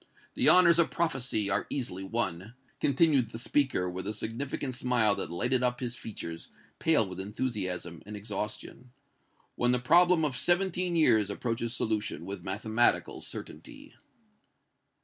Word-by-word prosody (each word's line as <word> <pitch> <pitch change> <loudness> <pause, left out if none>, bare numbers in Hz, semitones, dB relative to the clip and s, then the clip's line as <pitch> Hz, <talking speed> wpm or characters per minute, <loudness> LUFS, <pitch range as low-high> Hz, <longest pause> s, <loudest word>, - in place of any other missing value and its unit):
The - - +5
honors 170 -2 +7
of 170 - +4
prophecy 130 -10 -1
are - - 0
easily 105 -9 -4
won," 95 0 -2 0.2
continued 140 -4 +2
the 115 - -8
speaker, 130 -5 0
with 90 +2 -5
a 105 - -2
significant 130 +5 -4
smile 120 -4 +2
that - - -4
lighted 120 +9 0
up 125 -1 0
his 120 -1 -4
features, 85 -9 -8 0.3
pale 155 -10 +3
with 95 0 -8
enthusiasm 95 -5 -4
and 105 0 -7
exhaustion, 105 +4 -6 0.6
"when 120 - 0
the - - +5
problem 170 +6 +4
of 140 -4 -2
seventeen 180 0 +1
years 110 -11 +4
approaches 115 +2 -3
solution 110 -2 -2
with 100 +1 -6
mathematical 110 +5 0
certainty!" - - -10
120 Hz, 140 wpm, -29 LUFS, 105-135 Hz, 0.6 s, honors